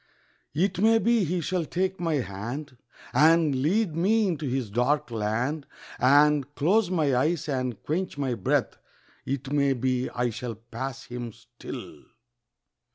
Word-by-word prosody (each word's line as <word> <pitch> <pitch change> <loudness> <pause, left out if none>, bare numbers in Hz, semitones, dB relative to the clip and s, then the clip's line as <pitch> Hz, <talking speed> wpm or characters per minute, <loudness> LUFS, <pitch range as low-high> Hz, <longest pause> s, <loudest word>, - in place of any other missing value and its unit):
It 180 +3 +1
may 225 +3 +5
be 230 -2 +2
he 175 +2 -1
shall 180 +1 -1
take 190 +4 -2
my 165 -3 0
hand 125 +5 -4 0.4
And 160 -2 +4
lead 180 +3 +1
me 210 +5 +3
into 155 -4 -2
his 125 -4 -2
dark 125 +4 +1
land 120 +7 -1 0.3
And 145 +2 +4
close 190 +6 +2
my 155 -7 +1
eyes 155 +6 +1
and 130 -6 -2
quench 175 +2 -2
my 135 -3 -1
breath 105 -6 0 0.5
It 135 0 -3
may 140 -2 +3
be 130 0 -1
I 125 -1 -1
shall 115 0 -5
pass 125 +4 -6
him 120 -1 -6
still. 120 +1 -10
140 Hz, 145 wpm, -26 LUFS, 125-170 Hz, 0.5 s, may